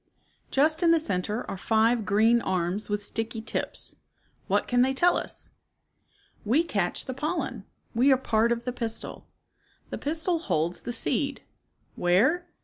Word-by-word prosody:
Just 310 +4 +2
in 340 - +4
the 330 0 +5
center 210 - -2
are 190 - -6
five 225 0 +2
green 225 +4 +4
arms 185 +2 -2
with 205 0 -1
sticky 225 +2 -3
tips. 220 - -4 0.5
What - - +1
can 245 0 +3
they 265 +1 +2
tell 350 +6 +4
us? - - -5 0.5
" - - -36
We 305 +7 +4
catch 200 - -1
the 260 - -4
pollen. 265 - -3 0.3
We 255 +5 +4
are 265 - +5
part 230 -2 +1
of 235 0 -1
the 250 - -2
pistil. 230 -2 -3 0.6
The - - -4
pistil 325 +3 +1
holds 170 - -1
the - - -5
seed. 240 - -1 0.5
Where? 260 - +2
235 Hz, 155 wpm, -27 LUFS, 210-280 Hz, 0.6 s, the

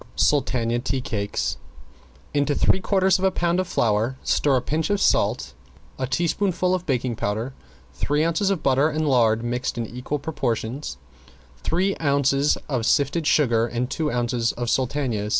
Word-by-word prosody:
~SULTANA 120 -5 +1
TEA 135 +1 -2
CAKES~ 105 -5 -2 0.8
Into 145 0 +1
three 190 - +3
quarters 190 -1 +2
of - - -4
a 190 - +5
pound 175 -1 0
of 185 - -1
flour 115 -1 0
stir 145 -2 +2
a 125 - +2
pinch 160 +6 -1
of 205 -1 +1
salt, 130 - +1 0.5
a 130 - -1
teaspoonful 180 +4 0
of 180 -1 -2
baking 125 -3 0
powder, 110 +6 -3 0.4
three 150 +2 0
ounces 170 +4 +1
of 195 -4 -1
butter 135 +3 +3
and 155 0 -1
lard 115 -4 +3
mixed 120 +1 -2
in 115 - -2
equal 125 +6 -4
portions, 135 -3 -3 0.6
three 185 - 0
ounces 140 -1 +2
of 125 -6 -1
sifted 150 +2 +1
sugar 120 -7 +3
and 120 +1 -3
two 155 -2 -1
ounces 120 -1 0
of 120 -1 -2
sultanas. 125 -6 -1
135 Hz, 160 wpm, -23 LUFS, 120-160 Hz, 0.8 s, a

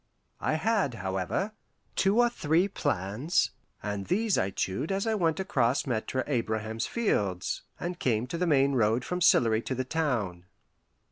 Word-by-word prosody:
I - - 0
had, 195 - +1
however, 95 - -2 0.4
two 195 +3 +3
or 240 - +6
three 170 -5 +1
plans, 120 - 0 0.3
and 100 -2 -3
these 210 +2 +2
I 95 - +1
chewed 95 - -2
as 195 +2 0
I 225 - +1
went 165 -6 +1
across 140 -10 +1
Maitre 130 +1 -1
Abraham's 110 -4 -1
fields, 100 - -1 0.2
and 175 0 -4
came 115 -2 +1
to 150 +7 -4
the 180 - +1
main 140 -3 +4
road 115 0 +2
from 180 - -2
Sillery 115 -8 +5
to 130 - -3
the 130 +1 -2
town. 120 - -1
130 Hz, 155 wpm, -29 LUFS, 110-180 Hz, 0.4 s, or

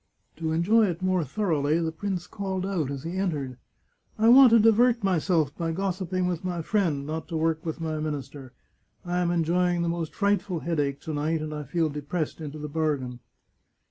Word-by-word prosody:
To 160 0 -2
enjoy 205 +7 +3
it 175 0 -4
more 185 -2 +2
thor 180 +7 -2
oughly 150 +2 +1
the 165 -1 -1
prince 180 +1 -3
called 190 -1 -4
out 180 -8 -1
as 140 -2 -5
he 170 +3 -4
entered: 145 -10 -2 0.3
" - - -41
I - - +7
want 260 +1 +9
to 230 - +6
divert 225 +1 +4
myself 165 -5 +1
by 165 -1 -2
gossiping 185 0 -1
with 175 -1 -3
my 175 -2 -3
friend, 165 -9 0
not 160 +2 -4
to 165 - -3
work 160 0 0
with 160 0 -4
my 160 -1 -3
minister, 145 -3 -5 0.5
I 175 0 -1
am 175 -1 +1
enjoying 175 +1 +1
the 170 - 0
most 170 -2 -3
frightful 200 -4 0
headache 145 -4 -1
to 160 - -5
night, 155 +2 0
and 155 0 -5
I 150 -1 -5
feel 160 +3 0
depressed 150 +3 -4
into 150 -1 -6
the 150 0 -5
bargain." 145 -5 -2
165 Hz, 200 wpm, -26 LUFS, 155-185 Hz, 0.5 s, want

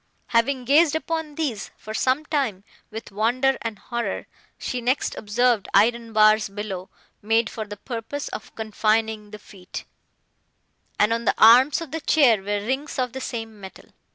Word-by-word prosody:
Having 250 +2 +1
gazed 300 +4 +4
upon 320 -2 -3
these, 275 -11 -3
for 215 - -8
some 260 +6 +1
time, 270 -11 -1 0.3
with 220 0 -8
wonder 245 +6 +1
and 225 -2 -4
horror, 235 +3 -4 0.3
she 250 - -4
next 255 +4 0
observed 225 0 +1
iron 230 +3 +3
bars 215 -1 +4
below, 195 -2 -6 0.3
made 225 +2 +1
for 220 - -5
the 205 0 -8
purpose 240 +6 -5
of - - -8
confining 220 0 0
the 210 - -9
feet, 190 -3 -10 1.1
and 210 +2 +3
on 230 0 -2
the - - +2
arms 250 +8 +7
of 325 -4 -7
the 320 +1 -4
chair 270 -9 +4
were 205 +1 -3
rings 270 +6 -3
of 250 -2 -1
the 265 - -5
same 225 -4 -6
metal. 190 -1 -12
230 Hz, 160 wpm, -23 LUFS, 215-265 Hz, 1.1 s, arms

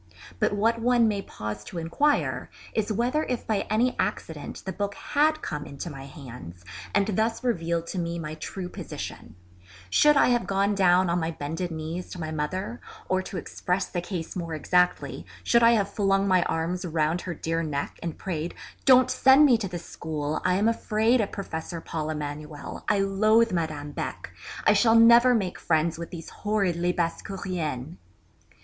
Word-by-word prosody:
But - - +2
what 225 +3 +1
one 240 -1 +4
may 205 -2 0
pause 105 - -6
to 175 - -8
inquire 170 - 0 0.2
is 220 -1 0
whether 245 +8 +1
if 250 -2 -3
by 215 -3 -1
any 240 +4 +2
accident - - -3
the 190 - -3
book 200 +1 -3
had 310 +1 +1
come 150 -1 -3
into 140 +4 -6
my 135 -1 -8
hands, 115 - -10 0.3
and 200 - +4
thus 220 +4 0
revealed 170 -8 0
to 180 - -4
me 170 0 -2
my 155 -2 -5
true 180 +4 -6
position, - - -7 0.6
should 295 - +5
I - - +5
have 240 -6 +1
gone 200 +2 +1
down 185 -2 +4
on 170 +1 +1
my 160 -1 -1
bended 160 +3 -4
knees 160 +2 -5
to 180 - -8
my 155 -1 -4
mother, 185 +9 -3 0.3
or 185 0 +2
to 185 - -6
express 180 +2 -2
the 175 - -3
case 175 -3 -5
more 170 -3 -3
exactly, 180 +3 +1 0.2
should 235 - +4
I 230 0 +7
have 200 -3 0
flung 195 -1 +2
my 185 -2 +4
arms 170 +3 -1
round 165 0 0
her 175 -2 -5
dear 165 +2 -1
neck, 145 -3 -3
and 165 -2 -4
prayed, 170 -2 -4 0.3
'_Don't 255 -1 +7
send 270 +3 +6
me 260 -4 +6
to 205 - -2
this 175 -2 -7
school; 155 -2 -3
I 180 - +2
am 205 +4 +2
afraid 230 +1 +2
of 200 - -2
Professor 170 -3 -5
Paul 155 -1 -4
Emanuel; 150 -1 -6
I 205 -1 +3
loathe 215 +4 +3
Madame 155 -4 -2
Beck; - - -5 0.3
I - - +6
shall 225 -1 +4
never 235 +2 +7
make 190 -5 -2
friends 165 0 +1
with 170 - -6
these 165 -2 -8
horrid 205 -4 0
Lesbassecouriennes? 170 -3 -2
180 Hz, 180 wpm, -26 LUFS, 160-215 Hz, 0.6 s, I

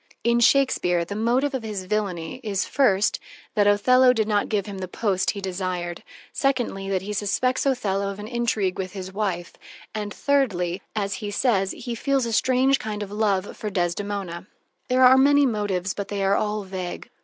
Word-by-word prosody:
In 235 0 +3
Shakespeare, 225 -10 +3
the 200 - -6
motive 245 +6 +1
of 260 - -2
his 210 -4 -5
villainy 185 -1 -2
is, 205 -3 -1
first, 210 -7 +2 0.3
that 205 -1 +3
Othello 250 +5 +5
did 220 -3 0
not 205 -2 +1
give 205 -3 0
him 200 -2 -7
the 185 - -4
post 190 0 0
he 200 - -3
desired; 180 -2 -3 0.3
secondly, 245 -8 -1
that 190 -1 -1
he 210 +2 -4
suspects 250 +7 0
Othello 200 -7 0
of 200 - -6
an 210 +1 -7
intrigue 225 -6 -1
with 185 0 -4
his 190 -1 -7
wife 190 -4 -2 0.4
and, 210 -1 -4
thirdly, 195 -11 0
that, 210 - 0
as 200 0 -3
he 205 - -3
says, 200 -3 +1
he 240 - -6
feels 270 +2 0
a 230 - -3
strange 260 +3 +3
kind 210 -1 -4
of 200 - -9
love 205 -2 0
for 215 - -4
Desdemona. 185 0 -3 0.4
There 255 0 +4
are 260 +1 +7
many 285 +1 +5
motives, 205 -6 -1
but 200 -1 -5
they 200 -1 -2
are 195 +1 +3
all 210 0 -1
vague. 185 -2 -6
205 Hz, 190 wpm, -24 LUFS, 190-235 Hz, 0.4 s, are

